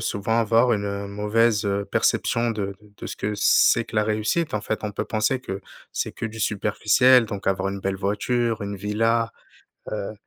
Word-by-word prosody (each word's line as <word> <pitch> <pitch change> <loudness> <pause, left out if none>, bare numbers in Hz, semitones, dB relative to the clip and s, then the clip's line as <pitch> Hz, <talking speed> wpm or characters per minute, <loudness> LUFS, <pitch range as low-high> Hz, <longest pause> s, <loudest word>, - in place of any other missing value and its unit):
souvent 110 0 -1
avoir 115 +3 +3
une 100 -1 -2
mauvaise, 105 +2 +1
heu, 100 0 0
perception 115 +3 +1
de 100 -3 -3
de 105 -1 -21
de - - -5
ce - - -5
que 105 - -3
c'est 115 +2 +4
que - - -13
la 105 - +3
réussite, 110 +10 0
en 105 - 0
fait. 110 - -3
On 105 - -2
peut 105 - -3
penser 120 +4 0
que 95 -5 -6 0.3
c'est - - -2
que 115 - -5
du 110 0 -8
superficiel 110 +4 +3
donc 100 -2 -6
avoir 95 0 +1
une 100 0 -4
belle 95 0 -2
voiture, 110 +4 -1
une 100 0 -4
villa, 115 +3 0 0.6
heu 105 0 -4
105 Hz, 195 wpm, -24 LUFS, 100-115 Hz, 0.6 s, c'est